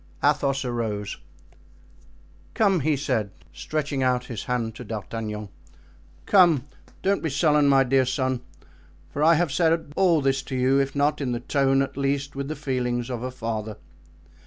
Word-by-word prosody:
Athos 140 -2 +2
arose. 110 -4 -3 1.4
"Come," 195 -5 +3
he 155 +1 +1
said, 120 -7 -1 0.2
stretching 140 - -3
out 125 -1 +1
his 120 -3 -6
hand 115 -3 -2
to 125 - -9
D'Artagnan, 105 -1 -5 0.8
"come, 170 -9 +5 0.4
don't 195 +1 +1
be 160 - -1
sullen, 150 0 +3
my 135 -1 +5
dear 130 0 +2
son, 130 -1 -1 0.7
for 145 - -1
I 165 +2 +6
have 165 -2 +1
said 165 -1 +1
all 180 -4 +4
this 135 -1 +1
to 135 - -6
you, 130 +2 +3
if 135 0 -1
not 145 +1 +1
in 125 -3 -1
the 120 - -2
tone, 135 +1 +2
at 135 0 -7
least 140 0 -1
with 140 0 -3
the 155 - -4
feelings 125 -4 -2
of 120 -2 -4
a 130 - -3
father. 110 -4 -4
135 Hz, 160 wpm, -25 LUFS, 120-145 Hz, 1.4 s, I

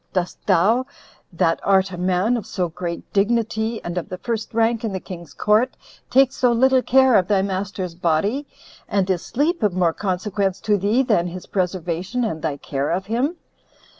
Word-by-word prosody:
Dost 180 -1 -2
thou, 210 +8 +3 0.4
that 165 -1 +1
art 190 -1 +3
a - - -5
man 185 +6 +1
of 230 - -4
so 180 -2 -2
great 170 +1 -6
dignity, 220 +1 0
and 175 +1 -2
of 170 - -9
the 185 - -5
first 225 +1 -3
rank 230 0 +1
in 220 -3 -2
the 190 - -2
king's 175 -3 -10
court, 215 +4 +2 0.3
take 265 0 +5
so 250 -2 +2
little 260 +2 +4
care 265 0 +4
of 185 -4 +4
thy 195 -1 +2
master's 190 -2 -3
body? 180 - 0 0.4
and 195 -2 +1
is 175 -2 0
sleep 305 +6 0
of 210 -4 +2
more 175 -3 +2
consequence 195 0 -1
to 210 - +2
thee 205 +7 +2
than 210 -8 +2
his 180 +1 -7
preservation, 185 +4 -2
and 160 -9 -2
thy 150 -3 -2
care 140 0 -3
of 185 +3 -1
him? 250 - -1
195 Hz, 185 wpm, -22 LUFS, 180-230 Hz, 0.4 s, take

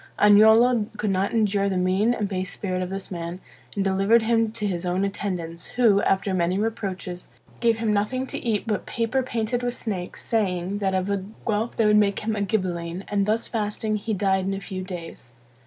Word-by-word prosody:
Agnolo 220 +2 +6
could 210 -1 0
not 195 +1 0
endure 205 -3 +1
the 190 - -1
mean 185 +5 +2
and 215 -4 -1
base 185 -1 -3
spirit 185 -2 -3
of 180 - -3
this 195 0 -5
man, 170 0 -5 0.4
and 200 - 0
delivered 195 +4 +3
him 225 -1 +2
to 220 -2 -3
his 180 -3 -2
own 180 +2 0
attendants, 180 -4 -4
who, 215 -5 +5
after 195 0 +1
many 180 0 +1
reproaches, 195 -5 -4 0.3
gave 230 -2 +3
him 225 -2 0
nothing 230 +6 0
to - - -6
eat 220 -4 0
but 215 -2 -2
paper 235 +3 0
painted 240 -1 -2
with 245 0 -1
snakes, 185 -6 -4
saying, 195 -3 0
that 190 -2 0
of 185 0 0
a 200 -2 -1 0.2
Guelph 220 +1 -1
they 225 - +3
would 210 0 +5
make 200 -2 +2
him 220 0 -1
a 205 - -2
Ghibelline; 185 -3 -2
and 200 -1 +1
thus 220 +2 +1
fasting, 215 -1 -2
he 215 +1 -2
died 190 -1 +1
in 195 0 -1
a - - -4
few 190 -2 -6
days. 170 -9 -8
200 Hz, 205 wpm, -24 LUFS, 185-220 Hz, 0.4 s, Agnolo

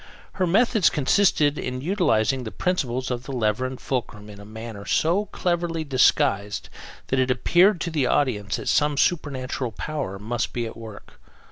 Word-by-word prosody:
Her 185 -2 0
methods 215 +1 +3
consisted 150 -1 +2
in 125 0 -4
utilizing 135 - +1
the 110 - -5
principles 130 -8 -1
of 125 0 -4
the - - -6
lever 120 0 0
and 130 0 -8
fulcrum 105 -5 -4
in 100 - -12
a 100 - -11
manner 110 -1 -8
so 175 - +1
cleverly 175 -2 -1
disguised 105 -7 +1 0.4
that 135 - +1
it 130 0 +1
appeared 175 - +3
to 170 - -2
the 145 -5 +1
audience 105 -11 0
that - - -6
some 150 -1 +2
supernatural 130 -6 -1
power 135 -6 -4
must 115 +4 -3
be 120 -1 -2
at 115 - -7
work. 110 -3 -12
130 Hz, 165 wpm, -24 LUFS, 110-160 Hz, 0.4 s, methods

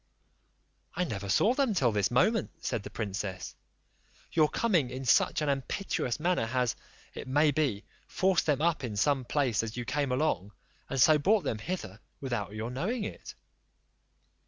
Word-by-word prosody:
"I 180 - +1
never 100 - -4
saw 205 - +4
them 260 -6 +1
till 125 -9 +3
this 105 -2 +1
moment," 205 - +2
said - - -2
the 100 - -8
princess. 100 -3 -5 0.8
"Your 155 -2 +3
coming 175 - +1
in 130 +1 -6
such 130 - +3
an 150 - 0
impetuous 135 - -2
manner 170 -8 +1
has, 125 0 0 0.4
it - - -7
may 145 +3 +3
be, 135 -8 0 0.2
forced 185 -3 +1
them 150 0 +1
up 170 -4 +1
in 115 -4 -4
some 135 +3 +2
place 130 -4 +1
as 115 +1 -6
you 120 - -3
came 140 +1 -1
along, 125 -8 0 0.4
and 135 - -2
so 155 +4 +6
brought 200 +6 +3
them 115 -6 -2
hither 110 - -5 0.2
without 120 -7 -3
your 110 +3 -4
knowing 205 - -2
it." - - -7
135 Hz, 165 wpm, -29 LUFS, 110-160 Hz, 0.8 s, so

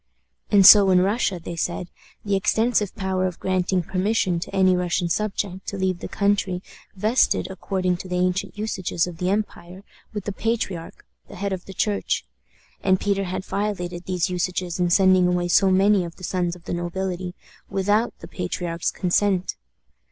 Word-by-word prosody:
And 200 -2 +5
so 200 0 +10
in 180 -1 +5
Russia, 195 -1 0
they 170 +1 -7
said, 175 +1 -3 0.3
the 200 -1 +1
extensive 220 +1 +1
power 190 -2 -1
of 180 - -7
granting 185 -1 0
permission 185 0 0
to - - -6
any 190 -1 +3
Russian 180 -1 0
subject 195 -1 -2
to 200 - -4
leave 185 -2 0
the - - -6
country 200 -2 0 0.3
vested, 215 +6 +2
according 185 -1 -1
to 185 - -8
the 180 - -3
ancient 180 +2 -1
usages 190 -5 -1
of 175 -2 -8
the 180 0 0
empire, 190 -2 -3 0.3
with 210 -3 -5
the 205 - -3
patriarch, 195 -6 -3 0.2
the - - -11
head 200 +1 -2
of 185 -1 -6
the 195 - -9
Church 205 +1 0 0.6
and 190 -1 +3
Peter 195 -1 0
had 185 +1 -4
violated 180 -4 -3
these 180 -2 0
usages 180 0 -2
in 175 -1 +2
sending 185 0 +5
away 180 0 +1
so 190 +2 +4
many 195 +1 +4
of 170 -1 -7
the 185 - -15
sons 175 -1 -1
of 175 - -16
the - - -5
nobility 180 +1 -3 0.3
without 205 +4 +1
the - - -8
patriarch's 175 -2 -3
consent. 190 0 0
185 Hz, 175 wpm, -23 LUFS, 180-200 Hz, 0.6 s, so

